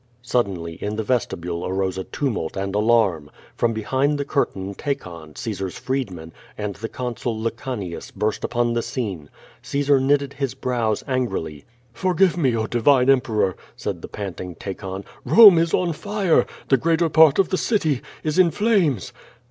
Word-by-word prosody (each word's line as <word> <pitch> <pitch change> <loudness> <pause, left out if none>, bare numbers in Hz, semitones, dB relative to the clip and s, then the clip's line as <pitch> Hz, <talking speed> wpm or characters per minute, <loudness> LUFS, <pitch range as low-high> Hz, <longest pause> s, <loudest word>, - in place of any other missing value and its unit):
Suddenly 95 -10 -1
in 105 +1 -2
the 110 - -2
vestibule 90 -8 -2
arose 95 0 -1
a 95 - -4
tumult 115 - -3
and 95 0 -2
alarm. 105 -8 +2 0.3
Prom 120 - +1
behind 130 +7 0
the 140 - -2
curtain 100 -9 -1
Tacon, 85 - -5
Caesar's 95 -5 -4
freedman, 95 -12 -4 0.2
and 105 -1 -3
the 110 +4 -6
Consul 120 -2 -4
Lecanius 115 -5 -4
burst 105 0 -2
upon 120 0 0
the 120 - 0
scene. 100 - -4 0.3
Caesar 140 -1 +2
knitted 140 +1 +1
his 135 -2 -3
brows 120 -4 -1
angrily. 120 - -2 0.3
"Forgive 185 +5 +2
me, 130 -9 +1
oh, 110 - 0
divine 125 +3 +4
Emperor!" 110 -8 +1 0.2
said - - -4
the - - -7
panting 90 -3 -6
Ta 100 - -5
con. 95 +1 -7 0.2
"Rome 205 -7 +8
is 165 0 +1
on 175 -2 +1
fire! 200 0 +1 0.2
The 135 - +5
greater 165 +4 +2
part 160 -2 +6
of 195 - +3
the 185 - 0
city 160 - +1 0.2
is 155 +3 0
in 180 -2 +6
flames!" 165 - +1
120 Hz, 160 wpm, -22 LUFS, 95-145 Hz, 0.3 s, Rome